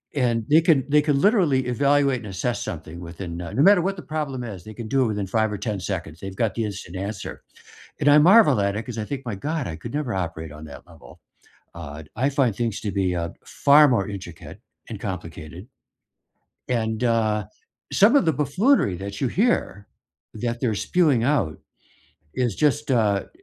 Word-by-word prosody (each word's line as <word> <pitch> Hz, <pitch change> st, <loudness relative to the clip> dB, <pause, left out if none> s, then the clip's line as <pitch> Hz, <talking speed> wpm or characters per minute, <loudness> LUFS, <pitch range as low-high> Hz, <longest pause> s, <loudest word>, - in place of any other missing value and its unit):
and 120 Hz, -5 st, +1 dB
they 155 Hz, +3 st, +6 dB
can 160 Hz, -6 st, +3 dB
they 150 Hz, +1 st, +5 dB
can 145 Hz, -2 st, +1 dB
literally 170 Hz, -, +3 dB
evaluate 140 Hz, +1 st, +2 dB
and 110 Hz, -, -9 dB
assess 100 Hz, +5 st, -2 dB
something 80 Hz, +1 st, -7 dB
within, 85 Hz, 0 st, -7 dB
uh 85 Hz, -2 st, -6 dB
no 135 Hz, -, +2 dB
matter 200 Hz, 0 st, +6 dB
what 195 Hz, +3 st, -1 dB
the -, -, -6 dB
problem 150 Hz, -5 st, -4 dB
is, 100 Hz, -7 st, -7 dB
they 110 Hz, -, -10 dB
can 115 Hz, -2 st, -7 dB
do 135 Hz, +3 st, +2 dB
it -, -, +1 dB
within 105 Hz, -2 st, -2 dB
5 110 Hz, +2 st, 0 dB
or 105 Hz, -, -3 dB
10 105 Hz, -4 st, -3 dB
seconds, 85 Hz, -4 st, -5 dB
they've 95 Hz, +1 st, -7 dB
got 110 Hz, -1 st, 0 dB
the 115 Hz, -, -1 dB
instant 100 Hz, -3 st, -7 dB
answer. 100 Hz, +1 st, -6 dB, 0.6 s
And 145 Hz, -, +3 dB
I 145 Hz, -, +7 dB
marvel 170 Hz, -, +6 dB
at 100 Hz, 0 st, 0 dB
it, 110 Hz, -, -3 dB
'cause 125 Hz, -3 st, -7 dB
I 105 Hz, -, -3 dB
think, 135 Hz, +2 st, -6 dB
"My 115 Hz, -, -3 dB
God, 150 Hz, +7 st, -3 dB
I 80 Hz, -, -5 dB
could 115 Hz, -, -8 dB
never 145 Hz, -5 st, -2 dB
operate 80 Hz, -4 st, -4 dB
on 75 Hz, +1 st, -10 dB
that 70 Hz, -3 st, -11 dB
level," -, -, -16 dB, 0.6 s
uh, 80 Hz, -2 st, -8 dB
I 130 Hz, +5 st, +1 dB
find 135 Hz, -6 st, +1 dB
things 115 Hz, -3 st, -2 dB
to 105 Hz, -, -3 dB
be, 95 Hz, -2 st, 0 dB
uh, 85 Hz, -1 st, -2 dB
far 145 Hz, +2 st, +5 dB
more 115 Hz, -7 st, +1 dB
intricate 90 Hz, -5 st, -9 dB, 0.3 s
and -, -, -7 dB
complicated. 90 Hz, -, -7 dB, 1.0 s
And, 110 Hz, -1 st, -1 dB
uh, 110 Hz, -3 st, +1 dB, 0.5 s
some 210 Hz, +7 st, +5 dB
of 280 Hz, -, +4 dB
the 160 Hz, -, +2 dB
buffoonery 150 Hz, -, +2 dB
that 100 Hz, +2 st, -7 dB
you 135 Hz, -, +2 dB
hear 180 Hz, -, 0 dB, 0.5 s
that 120 Hz, +1 st, -3 dB
they're 115 Hz, -4 st, 0 dB
spewing 145 Hz, -, +2 dB
out 120 Hz, -, 0 dB, 0.8 s
is 120 Hz, -6 st, 0 dB
just 150 Hz, -1 st, +1 dB
a 105 Hz, -5 st, +1 dB
115 Hz, 195 wpm, -23 LUFS, 95-140 Hz, 1.0 s, I